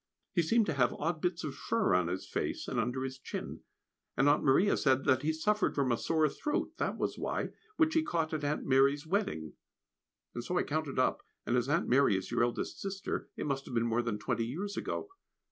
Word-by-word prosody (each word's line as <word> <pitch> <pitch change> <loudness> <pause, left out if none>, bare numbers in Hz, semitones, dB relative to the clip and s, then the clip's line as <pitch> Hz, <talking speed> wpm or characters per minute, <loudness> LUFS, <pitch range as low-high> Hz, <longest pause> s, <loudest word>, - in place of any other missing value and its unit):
He 175 - +3
seemed 225 +7 +3
to 160 - -1
have 125 -4 +2
odd 160 0 -2
bits 180 0 -1
of 150 -3 -3
fur 225 - 0
on 90 -2 +3
his 90 +2 -3
face - - -3
and 125 - -1
under 125 +3 -1
his 130 0 -5
chin, - - -6 0.6
and 135 +3 +4
Aunt 145 +1 +4
Maria 175 +9 +4
said 135 -1 +2
that 130 -2 +3
he 155 +2 +1
suffered 210 +7 +1
from 135 -3 +1
a 120 - +2
sore 160 -2 +2
throat, 295 - -2
that - - -1
was - - -2
why, - - -2 0.3
which 315 -1 +3
he 320 - +4
caught 165 - -1
at 155 -1 -2
Aunt 145 +1 -1
Mary's 140 +2 +3
wedding; 160 - -1 0.8
and - - -4
so - - -1
I - - +3
counted - - -2
up - - +2 0.2
and 120 - +1
as 125 +2 +1
Aunt 165 +4 +1
Mary 130 -6 +4
is 95 - -6
your 120 - +1
eldest 120 0 -1
sister, 195 -1 -4
it - - -4
must 140 -2 -2
have 125 - -6
been 115 0 +2
more 115 +1 +1
than 115 -3 -2
twenty 115 +1 -1
years 195 +11 -4
ago. - - -3
140 Hz, 225 wpm, -32 LUFS, 120-170 Hz, 0.8 s, and